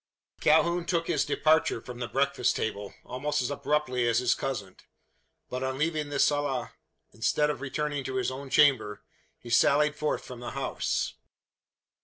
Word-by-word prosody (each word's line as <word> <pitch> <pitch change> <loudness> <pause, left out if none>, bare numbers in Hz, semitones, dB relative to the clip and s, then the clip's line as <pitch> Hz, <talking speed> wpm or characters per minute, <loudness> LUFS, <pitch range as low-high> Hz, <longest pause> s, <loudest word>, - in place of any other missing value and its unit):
Calhoun 170 +3 +3
took 170 -2 0
his - - +1
departure 155 -6 +2
from 120 +1 -9
the 120 - -3
breakfast 140 +3 +1
table, 105 -2 -4
almost 145 +4 -2
as 125 +2 -1
abruptly 140 -4 0
as 115 - +2
his 125 0 +3
cousin; 115 -9 -4 0.7
but, 125 - -4
on 130 0 -2
leaving 155 0 -1
the 145 - -3
sala 145 -2 +1 0.4
instead 150 +6 +1
of 145 - -7
returning 145 +1 -2
to 130 - -4
his 130 0 0
own 135 +1 -7
chamber, 130 -7 +3 0.3
he 120 - -11
sallied 150 +5 +4
forth 150 0 -2
from 125 -2 -9
the 120 - -6
house. 135 -2 -1
135 Hz, 160 wpm, -28 LUFS, 125-150 Hz, 0.7 s, sallied